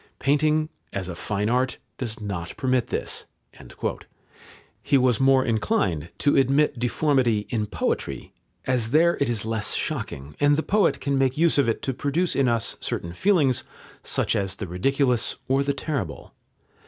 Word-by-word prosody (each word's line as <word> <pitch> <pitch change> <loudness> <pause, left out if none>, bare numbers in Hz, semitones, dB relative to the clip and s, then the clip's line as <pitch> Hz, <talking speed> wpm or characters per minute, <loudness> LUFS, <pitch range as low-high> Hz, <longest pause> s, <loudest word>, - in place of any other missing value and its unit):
Painting, 155 +2 +2 0.2
as 95 -2 -4
a 90 - -4
fine 105 +3 -2
art, 125 +2 +1 0.2
does 115 -4 -3
not 95 -5 -5
permit 130 -2 +1
this." - - -3 1.5
He 140 - +3
was 125 -3 +3
more 135 0 +4
inclined 95 -8 0
to 145 - +2
admit 135 0 +3
deformity 125 -3 +1
in 110 -3 -1
poetry, 70 -8 -3 0.3
as 125 -4 +1
there 165 +6 +4
it 140 - +2
is 110 -3 -1
less 110 -2 -1
shocking, 75 - -4
and 145 0 +4
the 160 - 0
poet 210 +1 +2
can 140 0 0
make 135 0 +1
use 165 -2 +3
of 130 -4 +3
it 115 - -2
to 135 - -1
produce 145 +7 0
in 135 -2 +3
us 115 -1 +1
certain 85 0 -4
feelings, 150 - +2 0.4
such - - 0
as 95 -1 -1
the 100 - -5
ridiculous 125 - +1
or 135 +1 +2
the 140 - 0
terrible. 135 - -4
130 Hz, 160 wpm, -24 LUFS, 105-140 Hz, 1.5 s, more